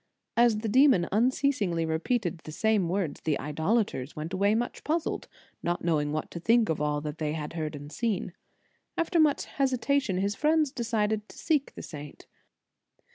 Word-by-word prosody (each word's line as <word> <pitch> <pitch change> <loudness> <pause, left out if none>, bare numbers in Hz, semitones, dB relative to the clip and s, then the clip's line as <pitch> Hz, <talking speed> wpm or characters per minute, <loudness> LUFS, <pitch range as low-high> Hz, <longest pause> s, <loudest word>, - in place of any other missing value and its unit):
As 230 -2 +4
the 225 - -2
demon 255 -6 +5
unceasingly 220 - +1
re 160 0 0
peated 180 -6 -1
the 155 - -9
same 210 0 +1
words, 180 -5 -2
the 155 -3 0
idolaters 160 - -1
went 155 +4 -5
away 200 +3 +3
much 240 +2 -2
puzzled, 320 +1 -1 0.3
not 175 0 -1
knowing 150 -3 +1
what 155 0 -3
to 170 - -5
think 225 +5 +3
of 160 -2 0
all 150 0 0
that 150 +1 -5
they 155 -1 -1
had 150 -2 -4
seen 165 -2 -3
and 145 -1 -6 0.4
heard. - - -20 0.6
After 335 +1 +1
much 300 -3 +3
hesitation, 265 -5 0
his 200 +2 0
friends 305 +3 +2
decided 220 -4 -1
to - - -13
seek 300 -4 0
the - - -8
saint. 150 -2 -9
200 Hz, 175 wpm, -28 LUFS, 155-240 Hz, 0.6 s, demon